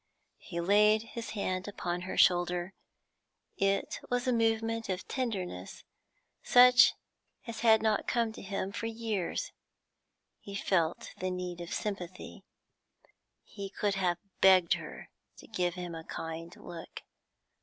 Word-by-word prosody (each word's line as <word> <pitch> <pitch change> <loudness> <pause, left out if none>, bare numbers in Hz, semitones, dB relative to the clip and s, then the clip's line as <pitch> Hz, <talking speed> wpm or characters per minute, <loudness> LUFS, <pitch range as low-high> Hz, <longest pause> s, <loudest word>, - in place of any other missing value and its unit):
He 170 -3 -6
laid 210 +4 +4
his 230 -1 -5
hand 185 -1 -2
upon 175 -3 -3
her 185 - -5
shoulder. 175 +1 +3 0.8
It 195 0 0
was 245 +1 0
a 250 - +3
movement 225 -1 0
of 185 0 -3
tenderness 190 - -4 0.6
such 250 0 +7 0.5
as 230 -2 -6
had 220 -2 +5
not 215 -1 +1
come 235 -2 +1
to - - -10
him 195 0 -3
for 230 - -4
years; 225 - -3 0.9
he 200 - -9
felt 175 -5 0
the 185 - -1
need 180 -1 -4
of 170 - -7
sympathy; 185 -4 -5 1.0
he 200 -2 -8
could 205 +1 -1
have 180 -3 0 0.2
begged 185 -3 +6
her - - -7 0.3
to - - -13
give 180 -5 -1
him 180 -2 -5
a 165 0 -7
kind 165 +1 -6
look. 165 -1 -9
195 Hz, 135 wpm, -31 LUFS, 175-225 Hz, 1.0 s, such